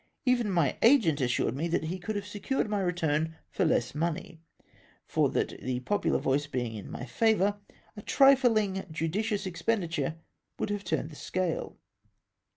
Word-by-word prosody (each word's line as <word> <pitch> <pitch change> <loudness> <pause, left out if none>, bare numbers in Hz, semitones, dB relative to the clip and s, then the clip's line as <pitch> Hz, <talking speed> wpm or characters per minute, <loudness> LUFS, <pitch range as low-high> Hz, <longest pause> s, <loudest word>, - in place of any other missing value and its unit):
Even 245 -4 +2
my 170 -8 +1
agent 225 - +5
assm^ed 125 -3 +1
me 155 +6 -2
that 165 - 0
he 175 +4 -3
could 210 +4 -4
have 205 0 -3
secm 205 +6 -3
ed - - +2
my 210 -1 -1
return 160 -3 0 0.2
for - - +1
less 120 0 +1
money, 165 +1 -3 0.6
for - - +2
that - - 0
the 125 -1 -2
popular 205 +11 +1
voice 140 +2 0
being 120 -5 -3
m 105 - -8
my - - -6
favom", 205 - +2 0.4
a 210 - -8
trifling 230 -8 +4
judicious 185 +7 -1
expenditm 175 -3 -1
e - - -18 0.4
would - - -2
have 205 -1 -2
turned 160 -2 -2
the - - -11
scale. 185 +2 -3
175 Hz, 165 wpm, -29 LUFS, 155-210 Hz, 0.6 s, agent